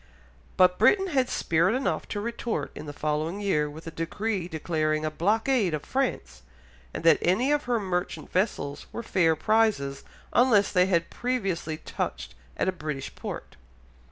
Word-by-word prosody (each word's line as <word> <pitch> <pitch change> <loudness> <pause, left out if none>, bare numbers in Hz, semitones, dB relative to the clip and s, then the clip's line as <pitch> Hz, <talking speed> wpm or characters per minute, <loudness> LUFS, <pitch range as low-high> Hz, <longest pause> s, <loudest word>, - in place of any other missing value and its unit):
But 180 0 +5
Britain 385 -1 +4
had 265 -6 +1
spirit 170 +6 +2
enough 260 - -1
to 205 - -3
retort 235 +1 -3
in - - -8
the - - -4
following 155 +5 -2
year 155 -8 +1
with 155 +2 -11
a 165 - -6
decree 185 +3 -2
declaring 155 -2 -1
a 155 - -1
blockade 210 - +1
of 150 - -7
France, 260 - -2 0.5
and - - -6
that 165 - +6
any 225 +11 +2
of 295 0 +1
her 240 -2 +1
merchant 185 -2 -3
vessels 180 -7 -1
were 235 - -5
fair 165 -6 +2
prizes 195 -8 +1 0.3
unless 230 -5 +4
they 180 -1 +4
had 170 -3 +1
previously 195 -11 -2
touched - - -4 0.2
at - - 0
a - - +3
British 155 -6 -5
port. - - -7
180 Hz, 160 wpm, -27 LUFS, 155-225 Hz, 0.5 s, that